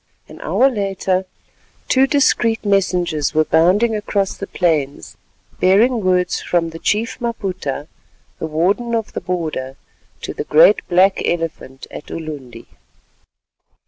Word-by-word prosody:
An - - -13
hour 265 - +3
later 195 -5 -1 0.6
two 265 +1 +4
discreet 235 -6 +2
messengers 180 -7 0
were 155 0 +3
bounding 190 +9 +3
across 205 -2 -1
the 195 - -7
plains, 145 - -1 0.4
bearing 220 +5 +3
words 180 -1 +1
from 165 -2 0
the 165 - -9
Chief 225 +8 -1
Maputa, 185 - -4 0.5
the 160 - -3
Warden 195 +10 0
of 225 -2 -3
the - - -4
Border, 155 -7 -4 0.5
to - - -5
the - - -4
"great - - +6
Black 185 +2 +3
Elephant" 165 -6 -3
at - - -9
Ulundi. 145 -7 -8
185 Hz, 125 wpm, -19 LUFS, 160-215 Hz, 0.6 s, great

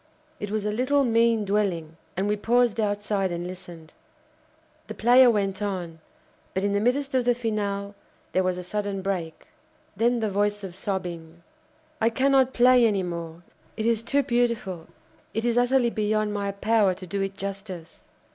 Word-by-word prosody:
It 205 - -4
was 210 0 -2
a 210 - 0
little, 260 +6 +2
mean 230 -2 +3
dwelling, 190 -6 -1 0.2
and 195 +2 0
we 210 - +1
paused 235 +1 +2
outside 205 -2 0
and 175 0 -4
listened. 175 -3 -10 0.9
The - - -7
player 245 +2 +6
went 200 -3 0
on; 180 -5 -4 0.6
but, 190 - 0
in 200 0 +1
the 200 - +2
midst 270 +5 0
of 255 -1 +2
the 245 0 +2
finale, 205 -4 -2 0.4
there 185 - +2
was 185 -1 0
a 180 - -5
sudden 200 0 -3
break; 175 -5 -3 0.5
then 235 +4 +2
the 220 - 0
voice 205 +1 0
of 190 -2 -6
sobbing: 175 -3 -5 0.6
"I 225 - +4
cannot 265 +2 +3
play 250 0 +5
any 205 -4 +2
more. 170 -1 -6 0.3
It 220 - -2
is 230 -1 +2
too 280 +5 +1
beautiful; 235 -9 -1 0.5
it 225 +1 -1
is 235 -1 +1
utterly 245 0 +3
beyond 215 -1 0
my 200 -1 -2
power 200 -1 +2
to 185 - -9
do 195 +3 -3
it 195 0 -3
justice. 195 -4 -7
205 Hz, 170 wpm, -25 LUFS, 190-235 Hz, 0.9 s, player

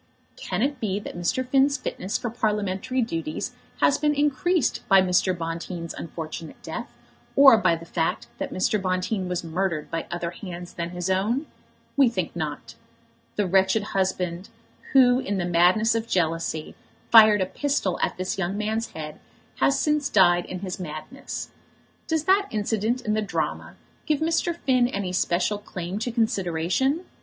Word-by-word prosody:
Can 185 +4 -2
it 280 -1 -1
be 205 -3 -1
that 205 - -8
Mr. 175 +9 -1
Finn's 275 +2 +3
fitness 190 +3 -3
for 240 - -4
Parliamentary 210 +2 -1
duties 165 -8 -3 0.3
has 280 - +4
been 295 0 +2
increased 295 +2 +1
by 195 -1 +7
Mr. 185 0 +2
Bonteen's 170 +1 -5
unfortunate 160 0 -7
death, - - -6 0.4
or 275 -3 +9
by 210 -6 +3
the 165 0 -9
fact 165 -8 -1
that - - -3
Mr. 195 +2 0
Bonteen 185 +1 -1
was 180 -1 -2
murdered 170 -1 -2
by 165 -1 -3
other 175 0 -3
hands 175 -1 -8
than 170 0 -4
his 180 0 -4
own? 210 +10 +1 0.5
We 275 -3 +5
think 235 - -3
not. - - -5 0.6
The 205 - +1
wretched 190 +3 +3
husband, 185 -1 -1 0.4
who, 250 -2 +6
in 205 -6 -2
the 180 - -1
madness 180 +6 +4
of 230 0 -2
jealousy, 165 -4 -1 0.4
fired 215 -3 +8
a - - +2
pistol 270 -4 -1
at - - 0
this 185 +1 -3
young 190 +2 -1
man's 220 +2 -2
head, 150 -1 -7 0.4
has 275 - +3
since 300 -1 +1
died 175 -3 +4
in 185 - -6
his 190 -1 -5
madness. 175 - -6 0.6
Does 320 -2 0
that 390 +4 +3
incident 220 +3 -1
in 215 -3 -1
the 215 - +1
drama 210 - -3 0.3
give 305 -3 +2
Mr. 330 +1 0
Finn 255 -6 +2
any 200 -7 -3
special 185 +3 +1
claim 185 -1 -5
to 240 +2 -2
consideration? 225 - 0
195 Hz, 160 wpm, -25 LUFS, 175-245 Hz, 0.6 s, or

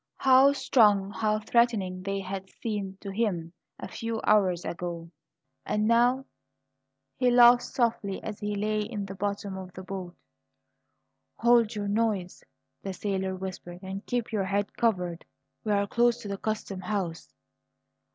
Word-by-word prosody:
How 265 +1 +6
strong, 210 -7 +3
how 215 0 0
threatening 210 -6 +1
they 195 +1 -2
had 190 0 -6
seemed 200 -4 -5
to 200 - -6
him 190 -6 -1 0.3
a - - -6
few 230 -1 -4
hours 190 -5 +3
ago! 170 -1 -5 0.5
And 210 0 0
now 245 +3 +3 0.9
He 250 -1 +3
laughed 240 0 +7
softly 225 -5 -1
as 210 -2 -6
he 205 0 -2
lay 215 +1 0
in 210 -1 -4
the 195 - -7
bottom 200 0 -3
of 185 -1 -9
the 185 - -8
boat. 185 -2 -6 1.2
"Hold 235 -2 +3
your 205 -1 -3
noise," 205 -4 -1 0.4
the 195 - -4
sailor 190 -1 -2
whispered, 185 -1 -7
"and 190 +2 -6
keep 240 -2 -2
your 205 -3 0
head 200 +1 -1
covered! 180 -7 0 0.4
We're 205 -2 +1
close 235 +3 +2
to - - -6
the 200 0 -3
custom 215 -3 -3
house." 185 -3 -4
205 Hz, 145 wpm, -28 LUFS, 190-225 Hz, 1.2 s, laughed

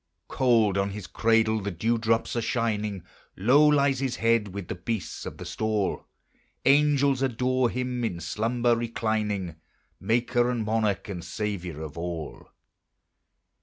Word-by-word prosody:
Cold 115 -7 +3
on 100 0 0
his 100 -1 -7
cradle 110 +1 +2
the 100 - -3
dew 110 +6 0
drops 115 +1 0
are 120 - 0
shining, 105 -5 -1 0.3
Low 130 +10 +5
lies 140 -3 +3
his 130 -2 -1
head 115 -2 +2
with 100 -2 -7
the - - -3
beasts 90 +2 -4
of - - -8
the - - -8
stall; 110 -3 -2 0.6
Angels 140 -1 +4
adore 130 -1 +1
him 125 0 -3
in 95 -7 -2
slumber 115 +8 0
reclining, 110 -6 -2 0.4
Maker 120 +3 +1
and 120 -3 -1
Monarch 105 -3 0
and 90 -4 -6
Saviour 90 -7 -4
of 75 +1 -7
all. 85 -3 -6
110 Hz, 140 wpm, -26 LUFS, 100-120 Hz, 0.6 s, Low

